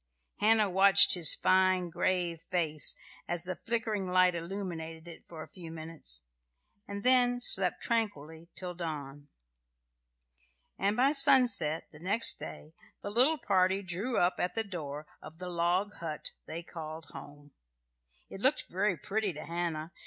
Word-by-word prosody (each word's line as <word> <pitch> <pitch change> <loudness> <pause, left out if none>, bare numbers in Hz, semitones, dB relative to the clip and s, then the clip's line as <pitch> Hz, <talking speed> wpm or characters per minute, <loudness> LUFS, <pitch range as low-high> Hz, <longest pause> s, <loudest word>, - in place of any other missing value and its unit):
Hannah 215 0 +3
watched 190 -1 +7
his 170 -5 +7
fine, 185 -2 +1
grave 175 -2 -1
face, 155 -5 0 0.3
as 175 -1 0
the 185 0 -4
flickering 220 -1 -3
light 185 0 +3
illuminated 170 -2 -7
it, 170 - -13
for 160 -2 -9
a - - -13
few 170 -3 -11
minutes, 155 - -4 0.6
and 200 0 -7
then 245 -1 +4
slept 190 -6 +1
tranquilly 170 -8 -3
till 180 -1 -6
dawn. 145 -4 -7 1.5
And 200 +3 0
by 265 +3 +3
sunset 240 - +5
next 190 +9 +1
day 155 - -10 0.3
the 205 - -5
little 260 +9 +2
party 190 -3 0
drew 195 +7 -3
up 175 +1 +1
at 180 - -2
the 225 - -1
door 155 -7 -7 0.2
of 160 - -13
the 180 +1 -7
log 175 +4 -1
hut 155 -3 -5 0.2
they 165 +2 -7
called 160 -1 -9
home. 145 0 -13 0.8
It 195 - -10
looked 265 +5 0
very 190 0 -1
pretty 200 +5 -3
to 150 - -9
Hannah. 170 -2 -4
180 Hz, 145 wpm, -30 LUFS, 160-200 Hz, 1.5 s, watched